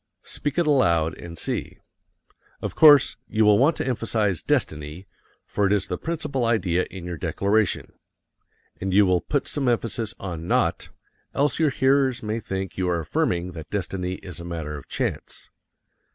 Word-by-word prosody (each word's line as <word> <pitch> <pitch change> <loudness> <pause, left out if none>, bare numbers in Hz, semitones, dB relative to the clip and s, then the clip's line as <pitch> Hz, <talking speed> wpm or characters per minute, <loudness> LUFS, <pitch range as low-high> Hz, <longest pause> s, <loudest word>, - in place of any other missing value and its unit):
Speak 145 +1 -3
it 175 - +3
aloud 85 - +3
and 85 -1 -9
see. - - -3 0.8
Of - - -4
course 145 -3 +7
you 110 0 +2
will 105 0 +6
want 150 +5 +4
to - - -3
emphasize 110 - 0
destiny, 75 +4 -1 0.4
for 100 -1 0
it - - 0
is 105 -2 +2
the - - -3
principal 150 -6 -2
idea 95 -6 +1
in 90 -2 -8
your 90 -1 -5
declaration, 100 +3 0 0.8
and 95 0 -2
you 105 0 +6
will 90 -2 +2
put 145 -2 -1
some 140 -3 -1
emphasis 115 -2 -1
on 85 -3 -6
not, - - +1 0.5
else 145 +3 +1
your 160 -2 +4
hearers 135 -2 +2
may 110 +1 -2
think 95 -3 -5
you 90 -1 +1
are 85 -1 0
affirming 85 +3 -1
that 80 -3 -9
destiny 90 -2 -3
is 90 -3 -8
a - - -7
matter 80 -3 -5
of 70 - -10
chance. - - -4
100 Hz, 165 wpm, -24 LUFS, 85-130 Hz, 0.8 s, course